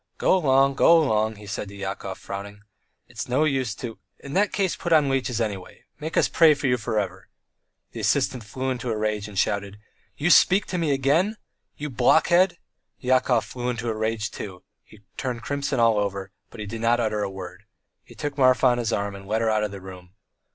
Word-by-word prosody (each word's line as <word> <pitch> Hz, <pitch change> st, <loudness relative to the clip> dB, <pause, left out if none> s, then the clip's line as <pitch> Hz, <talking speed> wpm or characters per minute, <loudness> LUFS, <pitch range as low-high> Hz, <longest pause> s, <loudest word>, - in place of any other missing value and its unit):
"Go -, -, +3 dB
along! 135 Hz, -5 st, +3 dB
go 165 Hz, +5 st, +6 dB
along," 110 Hz, -8 st, +1 dB
he 105 Hz, 0 st, -12 dB
said 105 Hz, 0 st, -4 dB
to 100 Hz, -, -11 dB
Yakov, 95 Hz, -1 st, -5 dB
frowning. 100 Hz, +1 st, -8 dB, 0.4 s
"It's -, -, -7 dB
no 130 Hz, +5 st, +2 dB
use 135 Hz, -7 st, 0 dB
to 115 Hz, 0 st, -7 dB
" -, -, -48 dB
"In 140 Hz, -, -7 dB
that 205 Hz, +4 st, +2 dB
case 190 Hz, -3 st, 0 dB
put 175 Hz, -, -5 dB
on 150 Hz, -4 st, +5 dB
leeches, 130 Hz, -3 st, -1 dB
anyway! 100 Hz, -5 st, -4 dB, 0.2 s
Make 160 Hz, +2 st, -4 dB
us -, -, +4 dB
pray 160 Hz, -3 st, +5 dB
for 140 Hz, -, -5 dB
you 125 Hz, -1 st, +3 dB
for 110 Hz, -1 st, -1 dB
ever." 100 Hz, -3 st, -5 dB, 0.6 s
The -, -, -8 dB
assistant 125 Hz, -3 st, 0 dB
flew 130 Hz, +5 st, -3 dB
into 125 Hz, -1 st, -4 dB
a 110 Hz, -, -1 dB
rage 105 Hz, -1 st, -2 dB
and 105 Hz, -2 st, -10 dB
shouted: 100 Hz, +1 st, -1 dB, 0.4 s
"You 165 Hz, +4 st, +2 dB
speak 190 Hz, +4 st, +5 dB
to 180 Hz, -, -2 dB
me 165 Hz, -3 st, 0 dB
again! 150 Hz, +11 st, +2 dB, 0.4 s
You 150 Hz, 0 st, -5 dB
blockhead... 175 Hz, +9 st, +4 dB, 0.2 s
." -, -, -54 dB
Yakov 130 Hz, -2 st, +3 dB
flew 125 Hz, -1 st, -4 dB
into 120 Hz, -1 st, -3 dB
a -, -, -4 dB
rage 110 Hz, -1 st, -2 dB
too, 100 Hz, -, -6 dB
and 90 Hz, -, -20 dB, 0.2 s
he 110 Hz, -, -17 dB, 0.2 s
turned 125 Hz, -3 st, -4 dB
crimson 140 Hz, -1 st, -2 dB
all 115 Hz, -2 st, +4 dB
over, 100 Hz, -1 st, -3 dB, 0.2 s
but -, -, -13 dB
he 105 Hz, -, -4 dB
did 110 Hz, +2 st, -6 dB
not 120 Hz, +1 st, +3 dB
utter 110 Hz, -2 st, 0 dB
a 100 Hz, -, -1 dB
word. 95 Hz, +1 st, -9 dB, 0.4 s
He -, -, -16 dB
took 145 Hz, -1 st, -5 dB
Marfa 130 Hz, 0 st, +4 dB
on 125 Hz, -1 st, +4 dB
his 120 Hz, -1 st, -1 dB
arm 100 Hz, -1 st, -1 dB
and 100 Hz, 0 st, -11 dB
led 110 Hz, +2 st, 0 dB
her 110 Hz, -, +2 dB
out 105 Hz, 0 st, +1 dB
of 105 Hz, -, -1 dB
the 100 Hz, 0 st, -8 dB
room. 90 Hz, -1 st, -12 dB
115 Hz, 220 wpm, -24 LUFS, 105-140 Hz, 0.6 s, go